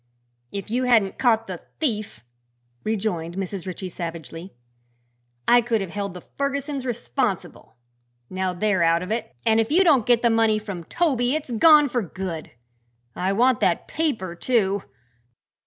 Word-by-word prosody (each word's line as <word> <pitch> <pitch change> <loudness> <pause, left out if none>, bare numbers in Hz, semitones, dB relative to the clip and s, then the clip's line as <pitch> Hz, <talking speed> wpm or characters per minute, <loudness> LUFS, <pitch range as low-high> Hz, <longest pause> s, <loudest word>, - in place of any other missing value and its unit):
"If 200 +2 -6
you 250 +2 +1
hadn't 225 -6 +3
caught 225 -3 +3
the 185 -4 -7 0.2
thief," 215 - -2 0.6
rejoined 190 -6 -2
Mrs. 190 -1 -4
Ritchie, 185 +1 -5
savagely, 170 +1 -7 0.9
"I 240 0 +6
could 230 -1 0
have 195 -4 -5
held 200 -2 -4
the 180 - -9 0.2
Fergusons 280 -1 -2
responsible. 240 - -3 0.5
Now 185 +3 -2
they're 190 +1 0
out 165 +1 +3
of 185 - -6
it 225 - -3
and 220 0 +4
if 225 - +1
you 360 +5 +5
don't 285 - +4
get 240 -1 +4
the 235 - +4
money 225 -1 +3
from 200 -6 -6
Toby 265 - +1
it's 300 -5 -4
gone 295 +5 +6
for 245 -2 -1
good. 180 -4 -5 0.7
I 185 +2 0
want 245 +3 +3
that 185 -5 +1
paper, 255 - -2
too." 200 -1 +1
215 Hz, 155 wpm, -24 LUFS, 185-245 Hz, 0.9 s, I